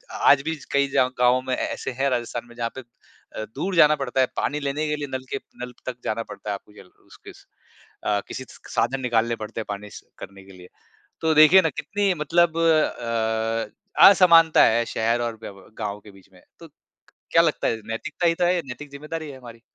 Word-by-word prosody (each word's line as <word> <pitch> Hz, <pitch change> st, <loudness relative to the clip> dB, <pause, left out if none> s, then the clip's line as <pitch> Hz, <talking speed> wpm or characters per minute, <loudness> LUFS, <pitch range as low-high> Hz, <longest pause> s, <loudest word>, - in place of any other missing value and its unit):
आज 140 Hz, -1 st, +5 dB
भी 160 Hz, 0 st, -1 dB
च 145 Hz, -, -15 dB
कई 140 Hz, 0 st, +2 dB
जाव 130 Hz, -1 st, +2 dB
गाँवों 125 Hz, +1 st, +4 dB
में 130 Hz, 0 st, -2 dB
ऐसे -, -, -4 dB
हैं 135 Hz, +2 st, -1 dB
राजस्थान 120 Hz, -1 st, -3 dB
में 120 Hz, -, -16 dB
जहाँ 115 Hz, -1 st, -2 dB
पे 130 Hz, -, -6 dB
अ, 120 Hz, -2 st, -12 dB
दूर 180 Hz, +6 st, -3 dB
जाना 150 Hz, -2 st, +6 dB
पड़ता 135 Hz, -2 st, -3 dB
है -, -, +4 dB
पानी 150 Hz, +1 st, -1 dB
लेने 145 Hz, +2 st, -2 dB
के 150 Hz, -, -1 dB
लिए 145 Hz, -1 st, -5 dB
नलके 130 Hz, +1 st, -4 dB, 0.2 s
नल 125 Hz, 0 st, -6 dB
तक 130 Hz, -, -4 dB
जाना 115 Hz, +1 st, -2 dB
पड़ता 105 Hz, -, -8 dB
है -, -, 0 dB
आपको 105 Hz, +1 st, -10 dB
जल 100 Hz, -, -15 dB, 0.2 s
उस -, -, -17 dB
किस -, -, -13 dB, 0.6 s
अ, 105 Hz, -1 st, +1 dB
किसी 130 Hz, -, -6 dB
स -, -, -15 dB, 0.2 s
साधन 135 Hz, 0 st, 0 dB
निकालने 115 Hz, -2 st, 0 dB
पड़ते 110 Hz, +1 st, -6 dB
हैं -, -, -4 dB
पानी 105 Hz, 0 st, -6 dB
स -, -, -11 dB, 0.2 s
करने 95 Hz, 0 st, -11 dB
के 95 Hz, -, -15 dB
लिए। 90 Hz, -1 st, -14 dB, 0.5 s
तो 160 Hz, -1 st, +1 dB
देखिए 155 Hz, +5 st, +8 dB
ना 160 Hz, -, +1 dB
कितनी 200 Hz, +7 st, -1 dB
मतलब 165 Hz, +2 st, +1 dB
अ, 115 Hz, -, +1 dB
असमानता 165 Hz, -4 st, +6 dB
है 115 Hz, +1 st, +3 dB
शहर 115 Hz, +2 st, +1 dB
और 115 Hz, -1 st, -2 dB
व्य 100 Hz, -, -7 dB, 0.3 s
गाँव 105 Hz, -1 st, -4 dB
के 105 Hz, -, -15 dB
बीच 95 Hz, 0 st, -19 dB
में। 90 Hz, -, -19 dB, 0.2 s
तो 165 Hz, -, -13 dB, 0.6 s
क्या 165 Hz, -, +6 dB
लगता 160 Hz, -3 st, 0 dB
है? 115 Hz, -, 0 dB
नैतिकता 150 Hz, +9 st, -3 dB
ही 165 Hz, -, +3 dB
तो 175 Hz, -, 0 dB
है 180 Hz, +1 st, +3 dB
ये 175 Hz, -, -1 dB
नैतिक 140 Hz, +3 st, -9 dB
ज़िम्मेदारी 150 Hz, +2 st, -7 dB
है 135 Hz, -, -10 dB
हमारी। 115 Hz, -2 st, -13 dB
130 Hz, 220 wpm, -23 LUFS, 115-155 Hz, 0.6 s, देखिए